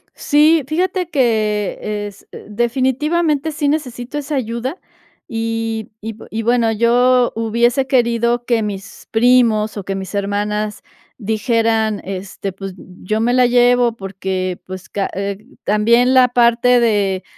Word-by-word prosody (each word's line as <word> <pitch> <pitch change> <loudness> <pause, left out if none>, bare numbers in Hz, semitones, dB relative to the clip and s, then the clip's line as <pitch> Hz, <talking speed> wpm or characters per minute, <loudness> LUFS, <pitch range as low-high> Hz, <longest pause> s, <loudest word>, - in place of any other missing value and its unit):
Sí, 305 +1 +3
fíjate 360 +2 -1
que 215 - 0 0.3
es 200 -1 -14 0.2
definitivamente 270 +7 0
sí 295 -1 -2
necesito 260 -3 -3
esa 295 +1 -3
ayuda, 250 +4 -3 0.5
y 225 -1 -3
y 220 0 -6
bueno, 235 -1 +2
yo 245 +2 +3
hubiese 235 +4 +1
querido 235 -2 +1
que 235 -3 +1
mis 200 -2 -7
primos, 225 -2 +3
o 200 - -4
que 195 +1 -4
mis 190 +1 -6
hermanas 210 +1 -2 0.4
dijeran, 220 -1 0
este: 195 0 -5
"Pues, 195 0 -7
yo 185 +4 -5
me 235 +2 +1
la 250 0 +4
llevo 245 -1 +3
porque, 190 -2 -4
pues, 185 0 -8
ca 200 -1 -2
eh, 200 0 -3 0.3
también 235 +4 +3
la 255 -1 +5
parte 245 0 +4
de 205 -5 +1
230 Hz, 130 wpm, -18 LUFS, 210-250 Hz, 0.5 s, la